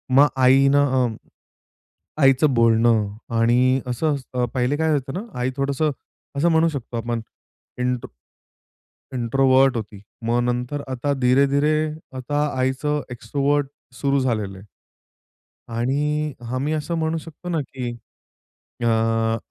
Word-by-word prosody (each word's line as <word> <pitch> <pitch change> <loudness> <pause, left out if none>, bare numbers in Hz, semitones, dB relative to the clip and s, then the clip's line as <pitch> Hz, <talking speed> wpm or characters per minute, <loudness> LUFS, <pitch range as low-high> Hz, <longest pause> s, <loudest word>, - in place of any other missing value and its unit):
मग 145 +2 +7
आईनं 135 +2 +5 0.2
अं, 115 -2 -3 1.1
आईचं 135 +1 +5
बोलणं 115 -2 +4 0.3
आणि 125 +3 +3
असं 145 +5 0 0.2
अ 125 -1 +1
पहिले 130 +3 0
काय 160 0 +1
होतं 135 -2 -2
ना, - - -3 0.2
आई 125 +1 0
थोडंसं 140 +2 0 0.5
असं 170 +4 +3
म्हणू 160 0 +4
शकतो 130 -5 -5
आपण 115 0 -2 0.6
इन्ट्रो 125 -1 -1 1.1
इन्ट्रोव्हर्ट 130 +2 +3
होती. 105 -2 -7 0.2
मग 120 +1 +2
नंतर 125 +4 -2
आता 130 +3 -1
धीरे-धीरे 140 +4 +3 0.4
आता 145 +3 -1
आईचं 140 +3 0
एक्सट्रोव्हर्ट 140 +4 0 0.3
सुरु 140 0 +2
झालेलं 110 -6 -1
आहे. 95 - -13 1.1
आणि 150 +5 0 0.2
आम्ही 140 +4 -1
असं 155 +2 -2
म्हणू 160 0 0
शकतो 165 +2 -9
ना 165 -3 0
की 125 -2 -3 1.0
अ, 115 0 +2
130 Hz, 120 wpm, -22 LUFS, 120-145 Hz, 1.1 s, मग